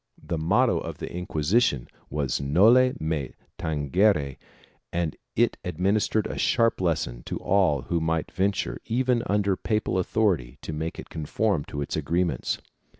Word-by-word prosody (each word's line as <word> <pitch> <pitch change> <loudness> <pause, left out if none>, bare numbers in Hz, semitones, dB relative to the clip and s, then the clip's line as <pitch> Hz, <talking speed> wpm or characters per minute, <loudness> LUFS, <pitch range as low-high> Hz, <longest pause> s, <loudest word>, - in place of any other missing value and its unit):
1 - - -19
The 85 - 0
motto 110 +10 +3
of - - -6
the - - -6
Inquisition 85 - +1 0.2
was 70 -3 -1
noli 110 - +5
me 80 -4 -2 0.3
tangere 75 -1 +1 0.5
and 85 -3 -1 0.2
it - - +2
administered 100 +5 +1
a - - -4
sharp 115 -5 +2
lesson 75 -9 -1
to - - -3
all 90 -8 +2
who 85 +6 -1
might 80 0 -1
venture, 95 -11 -1
even 120 +1 +1
under 100 -1 +2
papal 105 -2 -1
authority, 90 - 0
to 80 - -5
make 80 +2 -4
it - - -9
conform 80 +2 0
to 70 0 -4
its - - -4
agreements. 85 +4 0
85 Hz, 150 wpm, -26 LUFS, 75-105 Hz, 0.5 s, noli